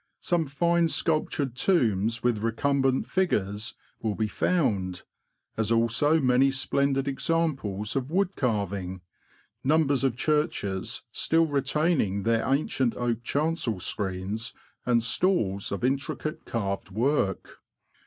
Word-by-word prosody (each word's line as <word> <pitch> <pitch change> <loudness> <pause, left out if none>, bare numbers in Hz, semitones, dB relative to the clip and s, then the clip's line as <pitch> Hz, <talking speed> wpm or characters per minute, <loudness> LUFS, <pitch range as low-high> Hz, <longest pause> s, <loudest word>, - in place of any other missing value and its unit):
Some 170 -3 +1
fine 170 +4 +2
sculptured 155 -5 0
tombs 115 - +1
with 120 -3 +2
recumbent 135 +3 +1
figures 105 - -1 0.3
will 110 -2 -1
be 110 - 0
found, 100 - 0 0.5
as 110 0 0
also 115 +7 +3
many 130 0 +4
splendid 135 0 0
examples 135 -9 -1
of 135 0 -1
wood 190 +3 0
carving, 100 - -2 0.6
numbers 145 -2 +2
of 130 -4 +1
churches 150 - -1
still 165 +1 +2
retaining 140 - 0
their 115 0 +2
ancient 135 -3 +1
oak 120 -2 -1
chancel 145 - -1
screens 100 +4 -3 0.3
and 120 -2 +3
stalls 115 - +1
of 100 - -3
intricate 135 +3 -2
carved 100 -4 -3
work. 110 -2 -1
125 Hz, 115 wpm, -27 LUFS, 105-150 Hz, 0.6 s, many